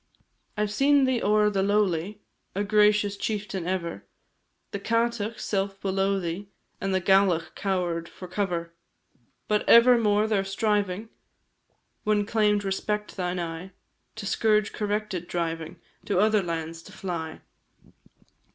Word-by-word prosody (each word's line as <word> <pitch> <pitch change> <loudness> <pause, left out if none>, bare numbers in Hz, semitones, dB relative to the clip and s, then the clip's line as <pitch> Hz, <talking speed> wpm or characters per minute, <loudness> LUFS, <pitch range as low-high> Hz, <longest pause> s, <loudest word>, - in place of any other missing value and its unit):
I 210 - +2
've 205 - -5
seen 275 +5 +4
thee 260 -2 +1
o'er 210 0 +3
the 195 -1 0
lowly, 200 -1 0 0.3
A 200 - 0
gracious 210 -1 +3
chieftain 200 -4 -3
ever, 175 -3 -3 0.7
The 200 - -3
Cátach 230 0 -1
self 195 -1 -2
below 195 0 0
thee, 180 +3 -5 0.3
And 195 - -1
the 190 - +2
Gallach 185 -3 +3
cower'd 175 -4 -2
for 185 - -10
cover; 175 -3 -2 0.7
But 210 0 +1
ever 235 +1 +8
more 210 -1 +3
their 210 -3 +1
striving, 205 +1 -1 0.9
When 210 -1 +2
claim'd 210 -1 +2
respect 210 +2 -2
thine 180 -1 -2
eye, 170 +2 -5 0.4
Thy 220 - -7
scourge 210 0 +2
corrected, 210 -4 -2
driving 165 -2 -3 0.3
To 200 - 0
other 215 +1 +4
lands 165 -2 -4
to - - -14
fly. 165 -4 -5
200 Hz, 135 wpm, -26 LUFS, 180-210 Hz, 0.9 s, ever